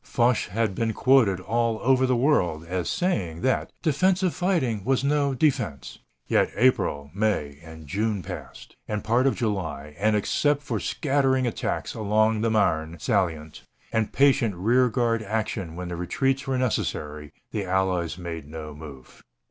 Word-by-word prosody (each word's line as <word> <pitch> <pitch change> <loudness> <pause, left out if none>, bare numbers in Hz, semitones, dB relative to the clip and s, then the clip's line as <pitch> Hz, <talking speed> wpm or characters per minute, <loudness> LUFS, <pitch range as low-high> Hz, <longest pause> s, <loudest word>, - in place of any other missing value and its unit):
Foch 120 -1 +1
had 110 +2 -1
been 115 +3 -1
quoted 120 -7 +4
all 115 +3 0
over 130 0 +3
the 130 - +2
world 90 - +1
as 90 0 -2
saying 100 - -1
that 130 - 0
"defensive 180 +4 +2
fighting 135 - 0
was 130 +3 +1
no 140 -1 +1
defense." 120 - -1 0.3
Yet - - +2
April, 75 - +1
May, 95 -9 -1
and 80 -1 -11
June 100 +4 -1
passed, - - -9
and 105 -1 -3
part 120 +4 +2
of 135 - +1
July, 80 - -3
and 105 +1 +2
except 145 +7 +1
for - - -2
scattering 135 -3 +1
attacks 120 - -2
along 110 +1 +1
the 115 - +1
Marne 85 -6 +1
salient, 85 - -1 0.3
and 110 -1 0
patient 130 -7 +3
rear 120 +8 +3
guard 115 -1 0
action 105 -5 -3
when 90 0 -5
the 90 - -4
retreats 135 - -1
were 135 -1 0
necessary, 75 - -2 0.2
the 105 -2 -2
Allies 90 -3 0
made 85 -4 -6
no 75 -1 -7
move. 75 -4 -12
110 Hz, 155 wpm, -25 LUFS, 85-130 Hz, 0.3 s, quoted